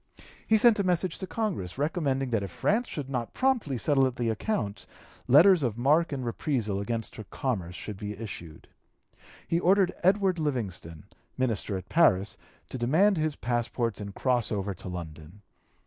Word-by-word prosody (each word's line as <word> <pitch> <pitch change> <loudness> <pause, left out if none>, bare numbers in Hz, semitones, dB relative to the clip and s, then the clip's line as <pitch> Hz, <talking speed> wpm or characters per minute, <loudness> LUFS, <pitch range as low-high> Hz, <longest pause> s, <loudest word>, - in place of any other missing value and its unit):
He 220 - +5
sent 225 -1 +5
a - - +2
message 180 -1 0
to 190 - -5
Congress, 165 - -3
recommending 140 -3 -1
that 115 -3 +1
if 100 - -4
France 215 - 0
should 145 -4 -5
not 125 -4 -4
promptly 245 - +1
settle 135 +1 +3
the 120 -2 -2
account, 110 - -2 0.4
letters 170 +6 +7
of 120 -5 -1
marque 150 +7 +3
and 135 -3 -3
reprisal 115 -5 -1
against 115 +1 -4
her 110 - -6
commerce 95 - -3
should 105 +2 -6
be 105 0 -6
issued. 85 -7 -9 0.8
He 165 - +1
ordered 185 +1 +3
Edward 190 -1 +3
Livingston, 100 - -3 0.3
minister 110 -5 -1
at 95 0 -9
Paris, 100 - +3 0.3
to 130 - -5
demand 170 - +3
his 155 -1 0
passports 120 -3 -2
and 100 -1 -7
cross 125 -3 +1
over 100 -1 -2
to 90 - -11
London. 85 +2 -8
125 Hz, 165 wpm, -28 LUFS, 105-165 Hz, 0.8 s, letters